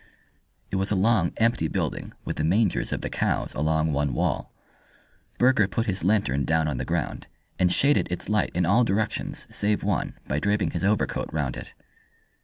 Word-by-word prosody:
It 95 - 0
was 95 +1 0
a 105 - +1
long, 95 -3 +3
empty 115 -8 +2
building, - - -3
with - - -4
the 75 - -1
mangers 95 +5 +1
of - - -2
the - - -3
cows - - -1
along 80 +1 +1
one 70 -2 0
wall. - - -1 0.9
Burger 125 -5 +4
put 100 +4 -1
his 95 -3 -2
lantern 90 -9 +2
down 80 +1 +1
on 70 -4 -2
the - - -2
ground, - - -3 0.3
and 90 -1 +3
shaded 140 -5 +3
its 90 - -3
light 105 0 +1
in 90 0 +2
all 105 +8 +4
directions 110 -1 -1
save 105 0 0
one 100 -3 -1
by 75 - 0
draping 105 +3 0
his 85 -1 -3
overcoat 105 +1 0
round 75 -6 -2
it. - - -9
95 Hz, 185 wpm, -25 LUFS, 80-105 Hz, 0.9 s, Burger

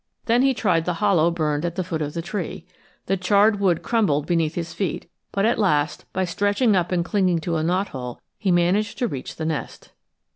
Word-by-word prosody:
Then 240 +2 +3
he 270 0 +3
tried 175 -8 +1
the 180 - -1
hollow 175 -4 +3
burned 155 -3 -1
at 170 -1 -2
the 185 - -1
foot 165 -3 -3
of 150 +1 -3
the 165 - -3
tree. 180 -3 -5 0.4
The 195 - 0
charred 205 +3 +3
wood 180 -4 +1
crumbled 185 -11 +1
beneath 165 -2 0
his 170 -1 -4
feet, 185 -6 -3 0.2
but 200 +1 +1
at 230 +1 +2
last, 150 -7 +1
by 185 0 0
stretching 205 +5 +1
up 180 -1 0
and 175 -2 +1
clinging 185 -2 +2
to 165 +1 -1
a - - 0
knothole, 160 -9 -2 0.2
he 200 - -1
managed 180 +4 +2
to 250 - 0
reach 135 - -6
the 160 - -4
nest. 160 -2 -4
180 Hz, 210 wpm, -23 LUFS, 160-205 Hz, 0.4 s, Then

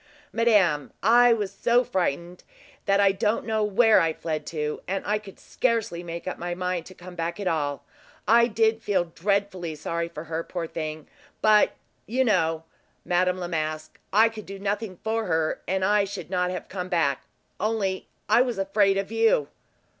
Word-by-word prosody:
"Madame, 200 -11 +3
I 240 +3 +6
was 210 -4 0
so 235 +5 +3
frightened 180 - -2 0.4
that 195 0 +3
I 200 -1 +5
don't 210 +3 0
know 220 -1 0
where 215 +2 +5
I 165 -1 +1
fled 155 -1 -4
to, 150 -2 -3
and 195 +1 -2
I 210 +1 +1
could 200 -2 -13
scarcely 225 -8 -1
make 170 0 -7
up 185 - -4
my 175 0 -3
mind 180 -1 -2
to 185 - -13
come 180 +1 -11
back 170 +2 -3
at 200 - -3
all. 145 -4 -1 0.4
I 235 +1 +6
did 225 0 +1
feel 195 -5 +1
dreadfully 190 -3 -1
sorry 170 +2 -3
for 155 - -8
her, 165 0 -4
poor 175 -1 -4
thing! 155 -1 -5 0.3
but 215 -1 +4 0.3
you 260 +4 +1
know, 165 -7 +1 0.4
Madame 180 0 +1
Masque, 155 -1 -3
I 220 +3 +6
could 220 -2 -8
do 195 0 -7
nothing 200 -1 -3
for 225 0 -1
her, 160 -2 0
and 190 +1 0
I 205 0 +3
should 190 -3 -7
not 180 -1 +1
have 180 -2 -5
come 185 -1 -5
back, 150 -7 +1 0.4
only 205 -3 -1 0.2
I 240 - +5
was 245 -4 0
afraid 195 0 +2
of 195 +1 -3
you." 225 -10 +2
190 Hz, 175 wpm, -25 LUFS, 170-215 Hz, 0.4 s, I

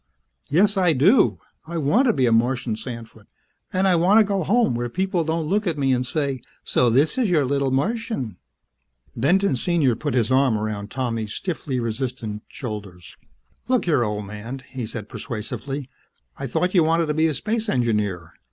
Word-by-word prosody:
"Yes, 195 +7 +3
I 180 -3 +4
do! 185 - +4 0.3
I 170 +1 -4
want 180 - +3
to - - +4
be 130 -4 +2
a 120 - +2
Martian 120 0 +1
sandfoot. 115 -2 -9 0.4
And 190 +1 +2
I 185 - +4
want 185 +6 +5
to - - +7
go 200 -2 -1
home 220 - +2
where 120 +1 -2
people 185 - 0
don't 160 0 -1
look 200 +5 0
at 165 -3 -1
me 135 -2 +2
and 125 0 -1
say, 140 -3 -2 0.2
'So 125 - +2
this 145 - +2
is 235 -6 +2
your 155 -6 +3
little 140 +1 0
Martian!'" 140 - -2 0.8
Benton, 170 - +2
Sr., 145 -3 +1
put 145 +2 -3
his 120 0 +1
arm 130 -4 +3
around 105 -1 -4
Tommy's 115 -5 -3
stiffly 150 -8 -3
resistant 115 -2 -3
shoulders. 100 -8 -8 0.5
"Look 255 -1 +2
here, 150 -8 +3
old 105 -1 -3
man," 110 +6 -7
he 130 -4 -5
said 110 -2 -6
persuasively. 125 +4 -5 0.5
"I 135 - -5
thought 180 +9 0
you 175 -4 +5
wanted 165 +1 +2
to 150 - -1
be 160 +1 +3
a 155 - 0
space 220 - -2
engineer. 105 - -1
135 Hz, 180 wpm, -23 LUFS, 115-170 Hz, 0.8 s, to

